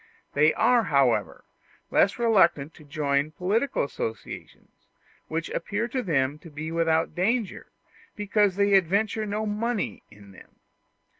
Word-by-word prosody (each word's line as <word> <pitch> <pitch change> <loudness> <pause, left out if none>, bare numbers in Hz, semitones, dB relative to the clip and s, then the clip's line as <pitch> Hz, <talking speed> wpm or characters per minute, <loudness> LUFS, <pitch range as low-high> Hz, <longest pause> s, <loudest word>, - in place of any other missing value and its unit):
They 150 +2 +4
are, 245 -3 +3
however, 140 -7 +1 0.5
less 195 - +3
reluctant 180 -11 +3
to 155 - -16
join 145 0 -1
political 215 +11 0
associations, 115 -5 -7 0.4
which 165 +1 -4
appear 210 +3 -2
to 255 +2 -2
them 145 - 0
to 165 - -13
be 155 +1 -6
without 165 -1 +1
danger, 210 +4 -1 0.5
because 205 -2 +1
they 200 0 +2
adventure 200 +4 +2
no 210 +1 -2
money 215 +1 -2
in 100 -1 -16
them. 95 - -17
180 Hz, 130 wpm, -26 LUFS, 150-210 Hz, 0.5 s, They